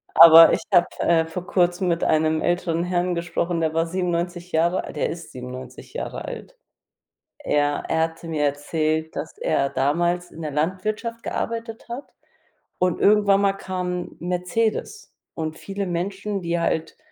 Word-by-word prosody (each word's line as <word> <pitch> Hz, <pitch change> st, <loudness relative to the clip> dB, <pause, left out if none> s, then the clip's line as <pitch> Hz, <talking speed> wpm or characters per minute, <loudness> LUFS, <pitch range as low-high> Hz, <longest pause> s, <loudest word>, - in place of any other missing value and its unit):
Aber 165 Hz, 0 st, +10 dB
ich -, -, 0 dB
habe, 175 Hz, -, +6 dB
äh, 165 Hz, -1 st, +3 dB
vor 175 Hz, +3 st, -7 dB
Kurzem 180 Hz, 0 st, +1 dB
mit 170 Hz, -1 st, 0 dB
einem 155 Hz, 0 st, +2 dB
älteren 175 Hz, -1 st, 0 dB
Herrn 180 Hz, 0 st, 0 dB
gesprochen, 170 Hz, 0 st, -2 dB
der 160 Hz, -1 st, 0 dB
war 165 Hz, +1 st, +1 dB
97 175 Hz, 0 st, -2 dB
Jahre 170 Hz, +3 st, +1 dB
alt, -, -, -9 dB
der 150 Hz, -, 0 dB
ist 165 Hz, -1 st, -7 dB
97 125 Hz, 0 st, -9 dB
Jahre -, -, -5 dB
alt. -, -, -8 dB, 0.8 s
Er 145 Hz, -, 0 dB
er 160 Hz, -, +2 dB
hatte 165 Hz, +1 st, -5 dB
mir 155 Hz, -2 st, -1 dB
erzählt, 155 Hz, +2 st, -1 dB
dass 160 Hz, -, -5 dB
er 140 Hz, 0 st, +1 dB
damals 170 Hz, +7 st, 0 dB
in 165 Hz, -, -10 dB
der 150 Hz, -, -3 dB
Landwirtschaft 210 Hz, -, -2 dB
gearbeitet 230 Hz, 0 st, -4 dB
hat 250 Hz, +4 st, -7 dB, 0.7 s
und 180 Hz, -1 st, +1 dB
irgendwann 200 Hz, -1 st, +5 dB
mal 200 Hz, -1 st, +2 dB
kam 180 Hz, -2 st, -4 dB
Mercedes 195 Hz, -, -2 dB, 0.2 s
und 160 Hz, 0 st, -4 dB
viele 195 Hz, 0 st, -4 dB
Menschen, 195 Hz, +3 st, -3 dB
die 170 Hz, 0 st, -1 dB
halt 160 Hz, -1 st, -1 dB
175 Hz, 155 wpm, -23 LUFS, 160-190 Hz, 0.8 s, Aber